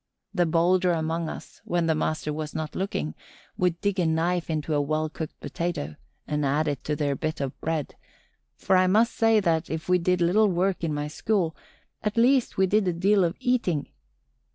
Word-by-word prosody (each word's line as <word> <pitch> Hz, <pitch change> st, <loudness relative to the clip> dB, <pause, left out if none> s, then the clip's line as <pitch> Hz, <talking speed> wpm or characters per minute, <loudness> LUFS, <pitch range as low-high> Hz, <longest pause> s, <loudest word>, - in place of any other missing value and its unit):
The 175 Hz, -4 st, +2 dB
bolder 175 Hz, +2 st, +3 dB
among 165 Hz, 0 st, -1 dB
us, -, -, -10 dB
when 175 Hz, -1 st, 0 dB
the 160 Hz, -, +3 dB
master 155 Hz, -1 st, -1 dB
was 155 Hz, 0 st, -5 dB
not 155 Hz, -1 st, -3 dB
looking, 80 Hz, -, -2 dB, 0.4 s
would 180 Hz, -2 st, 0 dB
dig 200 Hz, -1 st, 0 dB
a 175 Hz, -, +2 dB
knife 170 Hz, +2 st, 0 dB
into 155 Hz, 0 st, -1 dB
a 145 Hz, -, +2 dB
well 155 Hz, +2 st, -1 dB
cooked 155 Hz, 0 st, -7 dB
potato 145 Hz, -, -3 dB, 0.3 s
and 150 Hz, 0 st, -1 dB
add 145 Hz, +3 st, +1 dB
it 145 Hz, -3 st, -2 dB
to 150 Hz, -, 0 dB
their 145 Hz, -2 st, 0 dB
bit 155 Hz, +2 st, -3 dB
of 135 Hz, -2 st, -4 dB
bread; 160 Hz, -3 st, -2 dB, 0.6 s
for 190 Hz, -, +2 dB
I 185 Hz, 0 st, +5 dB
must 220 Hz, +5 st, +3 dB
say 225 Hz, -1 st, +4 dB
that, 165 Hz, -4 st, 0 dB
if 160 Hz, 0 st, -4 dB
we 180 Hz, 0 st, +4 dB
did 180 Hz, +1 st, +1 dB
little 190 Hz, +6 st, +4 dB
work 185 Hz, +1 st, 0 dB
in 165 Hz, -, 0 dB
my 145 Hz, 0 st, -2 dB
school, 170 Hz, +1 st, -1 dB, 0.5 s
at 210 Hz, +1 st, -2 dB
least 250 Hz, +2 st, +3 dB
we 190 Hz, -, +4 dB
did 200 Hz, +1 st, +2 dB
a 180 Hz, -, +2 dB
deal 195 Hz, +3 st, +3 dB
of 170 Hz, 0 st, 0 dB
eating. 210 Hz, -, 0 dB
170 Hz, 200 wpm, -26 LUFS, 155-185 Hz, 0.6 s, I